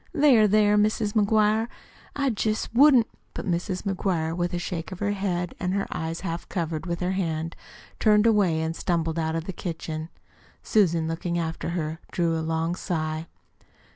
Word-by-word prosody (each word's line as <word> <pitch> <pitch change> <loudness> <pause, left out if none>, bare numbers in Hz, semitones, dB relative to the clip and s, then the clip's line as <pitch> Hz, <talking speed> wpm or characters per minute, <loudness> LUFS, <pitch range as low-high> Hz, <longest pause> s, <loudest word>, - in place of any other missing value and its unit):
"There, 275 -9 +5
there, 210 0 +4
Mis' 210 0 +1
McGuire, 215 +1 +3 0.5
I 275 -2 +1
jest 215 0 -1
wouldn't 260 -2 +6 0.2
" - - -41
But - - -5
Mrs. 180 +1 -2
McGuire, 180 -5 -1
with 175 0 -1
a - - 0
shake 175 -1 -4
of 185 - -6
her 205 +2 0
head, 180 -3 -2
and 185 0 -1
her 200 - 0
eyes 160 +1 -3
half 170 -2 -4
covered 165 -1 -3
with 170 0 -3
her 180 +1 0
hand, 165 -3 -2 0.4
turned 210 -1 +4
away 195 -8 +3
and 160 +1 -2
stumbled 165 -2 -1
out 160 0 -1
of 165 - -2
the 190 - -5
kitchen. 160 -2 -5 0.5
Susan, 170 -6 +2
looking 170 +1 -2
after 165 0 -3
her, 160 0 -3
drew 170 -2 +1
a 160 - -1
long 160 +1 -1
sigh. 160 -3 -3
175 Hz, 175 wpm, -26 LUFS, 165-210 Hz, 0.5 s, wouldn't